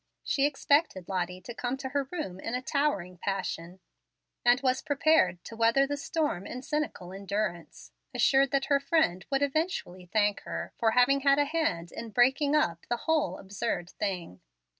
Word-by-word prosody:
She 280 0 +2
expected 285 - +1
Lottie 180 -1 -2
to 240 +6 -8
come 245 +2 -3
to 265 -1 -5
her 275 0 -2
room 295 - -4
in 225 +5 -3
a 250 - -2
towering 260 - -1
passion, 185 -2 -3 0.6
and 245 0 +5
was 255 -1 +1
prepared 295 - +2
to 230 - -9
weather 230 +4 +4
the 285 +1 -2
storm 285 - -2
in 255 +1 -6
cynical 280 -13 -3
endurance, 195 -3 -4 0.2
assured 270 0 +4
that 270 +1 +1
her 280 -2 +3
friend 275 - +1
would 275 0 +1
eventually 280 - -2
thank 205 -2 +2
her - - -5
for 225 - +3
having 260 +3 +4
had 275 0 +4
a 290 - +3
hand 290 - -1
in 230 - -7
breaking 265 +6 +3
up 170 - 0
the 240 - +1
"whole 305 - +1
absurd 190 -2 -3
thing." 180 - -4
245 Hz, 170 wpm, -29 LUFS, 190-285 Hz, 0.6 s, and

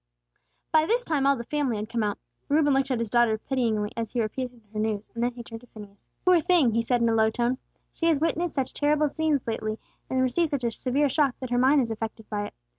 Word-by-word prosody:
By 315 0 +4
this 485 +4 +1
time 285 -4 +1
all 280 - +5
the 235 - -5
family 275 -3 -1
had 210 +1 -4
come 230 0 -2
out. 210 -1 -1 0.3
Reuben 290 -1 +3
looked 270 0 +1
at 255 - +1
his 230 -2 -3
daughter 240 -2 +3
pityingly, 220 -4 -1
as 230 -2 -3
she 245 - -3
repeated 245 +2 -3
her 215 - -3
news; 215 -1 -2
then 240 +1 0
he 240 0 -8
turned 225 0 -9
to 245 - -17
Phineas. 205 -3 -14 0.2
"Poor 365 -1 +6
thing!" 335 -8 +3
he 230 - +2
said, 240 +1 +1
in 230 - +3
a - - +2
low 220 -1 +4
tone. 240 +3 -1 0.3
"She 330 - -1
has 320 -4 +3
witnessed 330 +2 -1
such 265 -3 -1
terrible 300 0 +2
scenes 310 -2 0
lately, 215 -1 -3 0.3
and 260 - 0
received 315 +6 +1
such 280 -4 -2
a 235 - +1
severe 270 +5 +1
shock, 275 -1 +1
that 255 -2 -6
her 245 - +2
mind 270 +3 +5
is 230 -3 -2
affected 220 0 -5
by 205 -1 -2
it. - - -15
245 Hz, 250 wpm, -26 LUFS, 225-290 Hz, 0.3 s, Poor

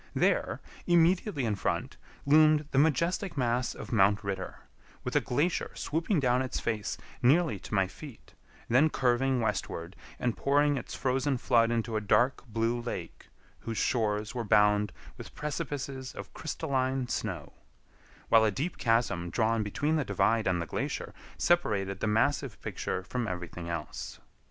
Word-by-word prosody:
There, - - +1 0.3
immediately 175 - +3
in 110 - +1
front, 100 - -2 0.3
loomed 155 0 +5
the 135 - +3
majestic 170 +4 +1
mass 125 -1 0
of - - -8
Mount 105 -1 +3
Ritter, 95 -2 -4 0.4
with - - -4
a - - +5
glacier 150 +8 0
swooping 165 +3 0
down 125 -2 +2
its 130 - -2
face 105 -3 -2 0.2
nearly 135 - +3
to 105 - -5
my 95 -1 +4
feet, 115 +6 -12 0.3
then 135 +7 +4
curving 130 -1 +1
westward 95 -5 -3 0.2
and 120 -2 -1
pouring 145 +1 +2
its 130 - -5
frozen 130 +1 0
flood 115 -2 +3
into 115 -1 -1
a - - -1
dark 120 +5 +2
blue 115 +1 0
lake, 105 -8 -6 0.3
whose 115 -1 -5
shores 105 -1 0
were 120 - -2
bound 105 -2 +3 0.3
with - - -10
precipices 140 -3 -4
of - - -8
crystalline 135 -5 -1
snow; - - -4 0.7
while 115 -1 +6
a 110 - +4
deep 145 - -3
chasm 115 -7 +1
drawn 115 +3 +1
between 145 +10 0
the 150 - +1
divide 115 -3 +1
and 90 -2 +1
the 85 - -2
glacier - - -4 0.2
separated 100 - +1
the - - -1
massive 120 +3 +1
picture 95 - -3
from 120 +4 -3
everything 90 -2 -5
else. 85 -3 -5
120 Hz, 150 wpm, -29 LUFS, 105-140 Hz, 0.7 s, while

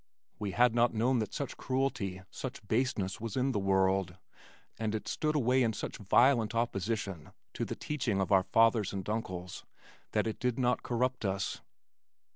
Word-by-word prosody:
We 100 -3 -3
had 120 +1 +4
not 120 0 +3
known 120 +3 +2
that 110 -3 -2
such - - -4
cruelty, 110 -8 -1
such 130 -5 -7
baseness 110 -5 0
was 115 -1 -4
in 130 +1 +2
the 105 - 0
world 95 -1 +1 0.6
and 110 -1 -1
it 110 - -4
stood 155 0 -1
away 130 -2 +3
in 115 -2 +2
such - - -5
violent 115 +2 +3
opposition 105 -6 -2 0.2
to - - -2
the - - -4
teaching 120 -9 -1
of 95 - -1
our 95 -1 +6
fathers 115 -3 +3
and 95 -2 -4
uncles 95 -5 -4 0.5
that - - +2
it 110 - -3
did 125 -2 0
not 125 -2 +1
corrupt 125 +1 -1
us. 95 -1 -2
110 Hz, 170 wpm, -31 LUFS, 95-125 Hz, 0.6 s, our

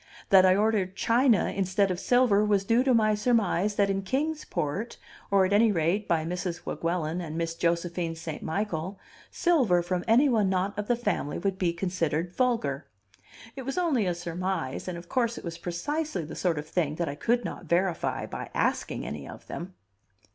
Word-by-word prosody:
That 190 -1 +7
I 185 - +5
ordered 205 -3 +1
china, 235 0 +3
instead 195 0 +1
of 180 - -3
silver, 245 -4 +3
was 205 -2 +2
due 230 +4 +3
to 265 - +3
my 215 -1 +3
surmise 210 -3 +1
that 200 -1 +3
in 195 0 -1
Kings 295 +9 -2
Port 185 +11 -3 0.3
or 195 -1 +4
at 190 - 0
any 220 +2 +5
rate 180 +4 0
by 160 -2 +1
Mrs. 180 0 -4
Weguelin 170 0 -2
and 160 -2 -5
Miss 165 0 -1
Josephine 170 0 -1
St. 160 -1 -6
Michael 185 +1 -3 0.3
silver 245 - +2
from 175 0 -2
any 240 +6 +5
one 220 -7 +2
not 190 +2 0
of 210 0 -4
the 245 - +3
family 205 -10 -2
would 190 +1 -2
be 175 -2 +2
considered 170 -1 -2
vulgar; 225 - 0 0.7
it 270 - -6
was 270 +4 -4
only 295 - +2
a 175 - 0
surmise, 175 -5 -3
and, 180 -2 -4
of 170 0 -10
course, 235 +1 0
it - - -8
was 170 0 -6
precisely 190 - -3
the 155 - -8
sort 175 -4 0
of 150 - -4
thing 155 -3 -1
that 170 0 -2
I 140 - -2
could 235 +11 0
not - - -6
verify 175 0 0
by - - -6
asking - - -1
any 70 -1 -6
of - - -11
them. 180 +2 -7
190 Hz, 190 wpm, -27 LUFS, 170-220 Hz, 0.7 s, That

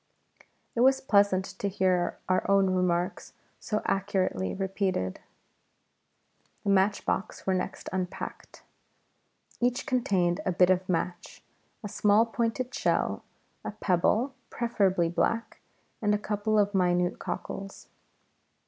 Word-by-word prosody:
It - - -3
was 265 +2 +5
pleasant 200 -5 +3
to 200 - -1
hear 185 -2 +1
our 185 0 +2
own 195 -1 +4
remarks 180 -1 -1 0.3
so 210 -1 -2
accurately 185 - 0
repeated. 190 - -2 1.4
The 200 - +1
matchboxes 195 0 0
were 190 - +2
next 185 - -3
unpacked; 185 -1 -5 1.0
each 245 0 0
contained 190 -8 +1
a 185 - 0
bit 180 +1 +5
of 185 0 0
match, 175 0 -3 0.4
a - - -3
small 210 +2 +3
pointed 235 +2 -2
shell, - - 0 0.4
a - - -3
pebble 215 +6 +1 0.2
(preferably 195 -7 +1
black), 230 +7 -1 0.4
and 210 -1 +2
a - - +1
couple 210 +1 -1
of 205 0 +2
minute 180 -1 +1
cockles. 195 +2 -6
195 Hz, 115 wpm, -28 LUFS, 180-210 Hz, 1.4 s, was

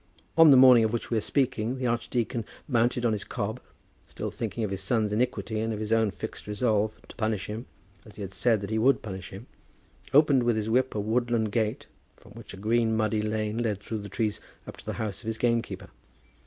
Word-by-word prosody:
On 165 -1 +8
the 135 - +8
morning 125 -3 +8
of 110 0 0
which 120 - -3
we 115 - +2
are - - +1
speaking, 125 -1 0
the 130 - -3
archdeacon, 120 0 -1 0.2
mounted 120 -1 +1
on 115 - +3
his 105 - -2
cob, 110 +1 -4 0.5
still - - -5
thinking 115 - -4
of 105 - -2
his 95 -1 -3
son's 105 +1 0
iniquity 110 -2 -1
and 110 +1 -1
of 105 - -3
his 110 +1 -1
own 110 -1 +3
fixed 95 - -7
resolve 105 0 0
to - - -13
punish 110 -3 -1
him 110 +4 -6 0.4
as 105 - -15
he 100 - -6
had 95 0 -7
said 115 -1 +2
that 100 - -5
he 110 - +1
would 135 +5 +3
punish 95 -3 -6
him, 100 +5 -10 0.7
opened 145 -2 +5
with 120 -1 +2
his 110 0 -2
whip 130 +1 +2
a - - 0
woodland 115 0 0
gate, 110 -1 -1 0.3
from - - -18
which - - -11
a - - -9
green 110 +2 +1
muddy 110 0 +1
lane 110 +1 -2
led 110 -4 -1
through 110 +1 -5
the 100 0 -8
trees 110 -2 -2 0.2
up - - -9
to - - -14
the - - -2
house 105 -3 -4
of 115 - -11
his 110 0 -2
gamekeeper. 115 -6 -1
110 Hz, 225 wpm, -27 LUFS, 105-120 Hz, 0.7 s, On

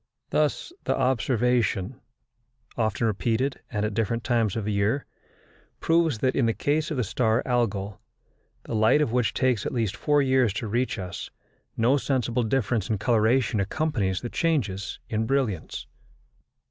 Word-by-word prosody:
Thus 155 - 0
the - - +1
observation, 125 -3 +1 0.7
often 110 0 0
repeated, 115 +5 0
and 105 -2 -1
at 105 - -2
different 115 +2 -1
times 115 -5 +1
of 110 -2 -3
year, 105 +6 0 0.7
proves 165 -6 +2
that 130 +4 0
in 120 - +2
the 115 - 0
case 150 +2 0
of 155 - -3
the 125 - +1
star 115 +2 +1
Algol, 105 -5 -1 0.6
the - - -6
light 110 +7 +4
of 120 - -2
which 125 -1 +1
takes 125 -5 +1
at - - -3
least 110 -5 -1
four 145 +6 +2
years 130 -5 +3
to 110 +2 -3
reach 120 +5 -1
us, 90 -2 -6 0.5
no 120 +5 +3
sensible 125 -3 0
difference 115 -3 0
in 110 - +1
coloration 110 0 +2
accompanies 105 -4 -1
the 120 - -4
changes 110 - -1
in 110 0 -1
brilliancy. 120 - -1
115 Hz, 150 wpm, -26 LUFS, 105-130 Hz, 0.7 s, light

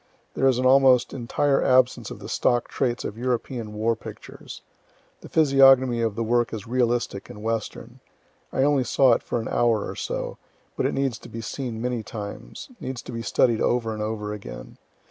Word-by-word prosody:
There 135 - +2
is 130 -2 +3
an 130 - 0
almost 130 -1 +5
entire 135 +2 +1
absence 130 -1 +3
of - - -8
the - - -10
stock 120 -1 +1
traits 120 -3 -1
of 110 - -6
European 120 -2 -2
war 110 +2 0
pictures. - - -11 0.6
The - - -12
physiognomy 135 -5 +5
of 115 -3 -1
the 115 - -1
work 120 +1 +1
is 105 -1 -7
realistic 120 -4 -1
and 105 - -10
Western. 115 -1 -4 0.5
I 135 - +1
only 140 -2 +3
saw 125 +1 +4
it - - 0
for - - -3
an 115 - -5
hour 115 -3 +1
or - - -6
so; - - -4 0.4
but - - 0
it - - -3
needs 135 -4 -1
to - - -12
be 115 - -6
seen 120 0 -5
many 125 -2 -1
times 105 -2 -8
needs 130 -2 -6
to - - -8
be 115 -1 -4
studied 115 +1 +2
over 115 -2 +1
and 110 - -5
over 105 -1 -3
again. 95 -13 -9
120 Hz, 190 wpm, -24 LUFS, 110-130 Hz, 0.6 s, almost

